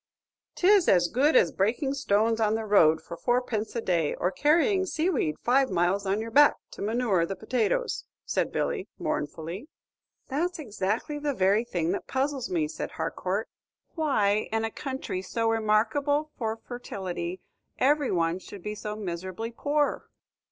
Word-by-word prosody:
"'Tis 385 0 +5
as 175 -2 +5
good 285 - +2
as 170 - +5
breaking 240 +8 0
stones 225 -4 +1
on 215 0 +2
the 225 0 -3
road 160 -7 +5
for 170 - -7
four 240 +9 +1
pence 220 -3 -4
a 235 - -1
day, 170 -7 0
or 180 - 0
carrying 335 - +3
sea 355 -1 0
weed 155 - 0
five 260 +2 +3
miles 185 +3 +1
on 195 +2 +1
your 225 +1 -5
back 290 +4 +6 0.2
to - - -10
manure 215 -4 +1
the 195 +3 -3
potatoes," 240 - -1 0.2
said - - 0
Billy, - - -2
mournfully. 165 - -4 0.6
"That's 335 +6 -1
exactly 230 - -2
the 290 -2 -1
very 195 +3 +3
thing 175 -8 -1
that 200 - -3
puzzles 270 -1 -1
me," 335 -4 0
said - - -6
Harcourt, - - -2 0.5
"why, 215 - +1
in 225 0 0
a 225 - -3
country 265 -9 -4
so 225 +4 -2
remarkable 225 +8 +1
for 225 -2 -2
fertility, 185 -7 -5 0.4
every 290 0 +3
one 170 0 +1
should 190 -1 -11
be 210 - -3
so 210 0 -5
miserably 190 +3 -5
poor!" 290 +4 -1
225 Hz, 160 wpm, -27 LUFS, 190-280 Hz, 0.6 s, back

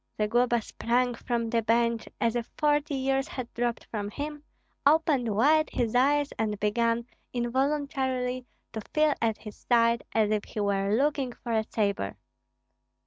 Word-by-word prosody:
Zagloba 235 +2 +2
sprang 245 +3 0
from 235 -1 -2
the 230 -1 +2
bench 230 +1 +1
as 230 0 +1
if 235 -1 -3
forty 295 -1 +1
years 270 0 0
had 250 -3 -6
dropped 240 -1 -2
from 205 -2 -3
him, 295 +6 -5 0.4
opened 280 -7 +3
wide 310 +8 +4
his 230 -2 -1
eyes, 285 +3 +3
and 210 -2 -1
began 230 +2 +1 0.3
involuntarily 255 0 -1 0.3
to 220 - -4
feel 305 -1 +4
at 225 -2 +1
his 210 -2 -10
side, 235 -1 +3
as 215 -1 +2
if 210 -1 +1
he - - -7
were 200 0 +1
looking 275 -1 0
for 235 0 -7
a 220 -1 +2
sabre. 200 - -1
240 Hz, 150 wpm, -28 LUFS, 225-270 Hz, 0.4 s, wide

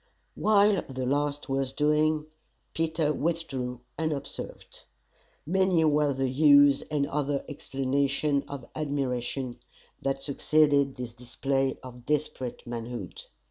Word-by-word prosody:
While 205 -1 +4
the 130 -1 -3
last 145 +2 -1
was 135 -1 -1
doing, 150 +1 +2 0.5
Peter 160 -2 0
withdrew, 135 -7 -2 0.2
unobserved. 150 -3 -5 0.6
Many 185 -1 +3
were 150 -1 +3
the 135 0 0
"hughs" 145 +1 +6
and 145 -2 +1
other 145 -1 -1
exclamations 140 0 0
of 140 -4 -7
admiration 130 -4 -2 0.4
that 135 0 -2
succeeded 140 -1 +3
this 125 -2 -6
display 135 +2 -1
of 125 -1 -11
desperate 145 -4 -2
manhood! 120 -4 -6
140 Hz, 105 wpm, -28 LUFS, 130-150 Hz, 0.6 s, hughs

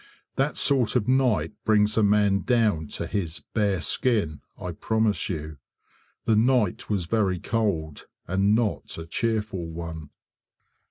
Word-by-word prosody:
That 135 +2 0
sort 130 -5 +3
of 115 -4 +1
night 130 -3 +2
brings 105 -1 +3
a 110 - +3
man 105 -1 +3
down 105 -9 +1
to - - -4
his 85 -5 -3
"bare 100 -5 +1
skin", 95 - 0 0.2
I 90 - -4
promise 110 +5 0
you. 75 -4 -5 0.7
The 110 - +3
night 115 -3 +2
was 100 -5 0
very 95 -1 +1
cold, 90 -10 -2 0.2
and 95 +3 +2
not 115 -3 -1
a 80 - -6
cheerful 105 -1 -2
one. 80 -2 -7
105 Hz, 140 wpm, -25 LUFS, 85-110 Hz, 0.7 s, sort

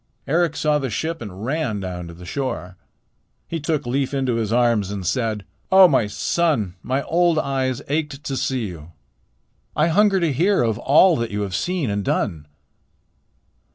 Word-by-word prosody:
Eric 165 +1 +1
saw 150 -1 +1
the 135 -2 -3
ship 165 +6 -3
and 100 -1 -7
ran 135 -6 -1
down 90 -2 -5
to 85 - -10
the 90 +1 -12
shore. 90 -5 -4 0.7
He 165 - -3
took 155 -2 -1
Leif 135 +3 -1
into 130 -3 0
his 110 -2 -2
arms 115 -5 +2
and 100 -2 -5
said: 110 +1 -1 0.3
"Oh, 190 -1 +9
my 130 -9 +2
son, 115 - 0
my 135 +2 -1
old 170 -1 +2
eyes 135 -3 -1
ached 150 -1 -2
to 135 - -3
see 130 -3 -1
you. 85 -3 -9 0.8
I 155 +3 +3
hunger 200 +3 +4
to 165 -5 +1
hear 180 +4 +2
of 115 -1 0
all 160 +7 +5
that 115 -1 -2
you 105 0 -3
have 100 -2 -3
seen 170 - -1
and 100 0 -1
done." 80 -6 -1
130 Hz, 175 wpm, -22 LUFS, 105-160 Hz, 0.8 s, Oh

